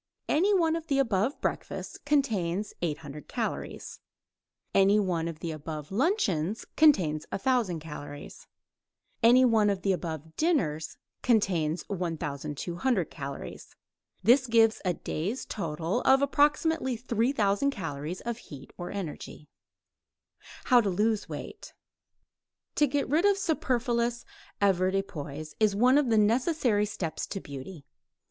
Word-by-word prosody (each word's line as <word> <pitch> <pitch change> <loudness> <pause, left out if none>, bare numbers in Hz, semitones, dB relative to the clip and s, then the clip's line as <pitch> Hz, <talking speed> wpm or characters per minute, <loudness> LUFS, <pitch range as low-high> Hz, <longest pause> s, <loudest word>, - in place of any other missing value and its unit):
Any 370 +7 +3
one 330 -5 +3
of 330 -1 -5
the 275 - +1
above 230 -1 +1
breakfasts - - -4
contains 210 - 0
800 150 -3 -4
calories. - - -4 0.7
Any 195 +2 +5
one 175 -5 0
of 165 -1 -7
the 165 - -3
above 155 0 -7
luncheons 210 - 0
contains 180 - +4
1000 230 -7 0
calories. 145 -2 -9 0.7
Any 245 +3 +6
one 220 -4 +4
of 195 -2 -2
the 195 - +2
above 160 -3 -4
dinners 165 - 0 0.2
contains 180 -9 +1
1200 170 - -2
calories. 140 -2 -8 0.5
This 255 +6 +5
gives 225 -1 +4
a 180 -3 0
day's 195 +14 -3
total 165 +4 -2
of 270 +1 +4
approximately 290 -2 +2
3000 230 0 +1
calories 165 - -5
of 235 -1 -4
heat 140 - -12
or 175 - -5
energy. 155 -5 -7 1.1
HOW 245 -1 +5
TO 205 - 0
LOSE 210 +3 0
WEIGHT - - -8 1.0
To 295 - +3
get 280 +1 -1
rid 315 +8 +2
of 405 -1 +4
superfluous 245 - 0 0.3
avoirdupois 185 -6 -1
is 215 -2 +3
one 250 +6 +5
of 280 -4 0
the 225 - +3
necessary 230 0 +2
steps 175 -6 -4
to 195 - -4
beauty. 140 +1 -9
205 Hz, 125 wpm, -28 LUFS, 165-255 Hz, 1.1 s, Any